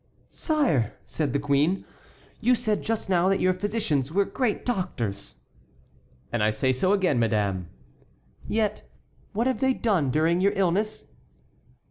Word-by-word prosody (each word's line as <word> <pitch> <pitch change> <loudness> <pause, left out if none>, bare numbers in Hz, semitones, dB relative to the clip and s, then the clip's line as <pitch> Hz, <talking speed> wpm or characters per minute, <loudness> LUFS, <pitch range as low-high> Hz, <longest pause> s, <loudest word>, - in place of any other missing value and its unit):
"Sire!" 265 - 0
said 150 -4 -2
the 140 - +1
queen, 145 +6 +1 0.5
"you 250 +1 +3
said 215 -2 0
just 225 -1 -2
now 185 -1 +3
that 195 - +2
your 185 0 +3
physicians 185 - -1
were 200 +3 +2
great 245 -3 -1
doctors!" 120 - -3 0.9
"And 120 - 0
I 105 - +4
say 130 +5 +1
so 185 +9 +1
again, 185 -10 +2
madame." 100 -6 0 0.8
"Yet 215 -1 0 0.5
what 225 +4 0
have 260 0 0
they 265 -1 +2
done 185 - +1
during 160 +6 +2
your 200 +1 +3
illness?" 195 +3 0
180 Hz, 140 wpm, -26 LUFS, 130-210 Hz, 0.9 s, I